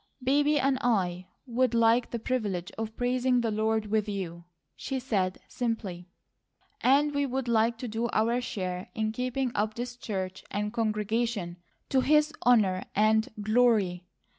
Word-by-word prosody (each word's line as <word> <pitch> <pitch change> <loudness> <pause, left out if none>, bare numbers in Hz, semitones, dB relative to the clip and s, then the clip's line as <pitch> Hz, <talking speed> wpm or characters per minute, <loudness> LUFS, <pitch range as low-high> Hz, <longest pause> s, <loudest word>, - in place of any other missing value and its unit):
"Baby 290 +3 +3
and 270 -1 +1
I 185 -7 0 0.2
would 245 -1 +1
like 230 +1 +4
the 235 - -3
privilege 210 -7 -2
of 220 0 -5
praising 250 0 +2
the 230 -2 0
Lord 220 0 0
with 215 0 0
you," 170 -4 -5 0.3
she 270 -1 -3
said 195 -7 -1
simply, 225 -8 -3 0.7
"and 285 +3 +4
we 285 0 +1
would 260 0 -2
like 230 0 +2
to 245 - -5
do 225 +2 -2
our 230 +3 +1
share 185 -6 -4
in 220 -1 0
keeping 250 +2 -2
up 215 +1 -1
this 245 +1 -5
church 190 -6 -5
and 210 +1 -2
congregation 215 -4 -1 0.3
to 265 - +3
His 300 +2 +3
honour 205 -7 +4
and 220 +1 +3
glory. 210 -5 +2
225 Hz, 150 wpm, -28 LUFS, 205-250 Hz, 0.7 s, like